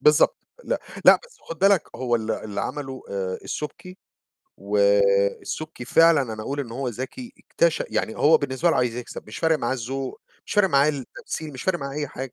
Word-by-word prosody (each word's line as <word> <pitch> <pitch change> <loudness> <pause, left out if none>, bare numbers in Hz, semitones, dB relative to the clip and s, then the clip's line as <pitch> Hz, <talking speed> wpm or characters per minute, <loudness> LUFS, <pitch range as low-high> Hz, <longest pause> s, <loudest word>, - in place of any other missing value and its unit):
بالضبط. 150 - +5 0.3
لأ، - - -1 0.2
لأ، - - +9
بس 485 - -19
خُد 165 - -8
بالك 195 -2 +5
هو 120 -2 +1
ال 110 0 -4
اللي 100 -2 -3
عَمله 135 -3 -5
آآ 95 -2 -3
السُبكي 180 +5 -6 0.6
والسُبكي 100 +7 +1
فعلًا 165 +2 +5
أنا 110 0 -6
أقول 140 +5 -3
إن 120 -4 -6
هو 130 +1 -3
ذَكي، 135 - -6
اكتش - - +1
يعني - - -1
هو - - +6
بالنسبة 165 - +1
له - - +1
عايز 120 -2 +1
يكسب، 125 -3 -7
مش 105 - -8
فارق 160 -1 +2
معاه 120 - -1
الذوق، 130 +1 -4 0.3
مش - - -5
فارق 205 -2 +4
معاه 140 -2 +4
التمثيل، 150 +2 -5
مش 130 - -7
فارق 185 -2 +1
معاه 140 0 -5
أي 150 -2 -2
حاجة. 130 -1 -7
135 Hz, 190 wpm, -24 LUFS, 115-160 Hz, 0.6 s, لأ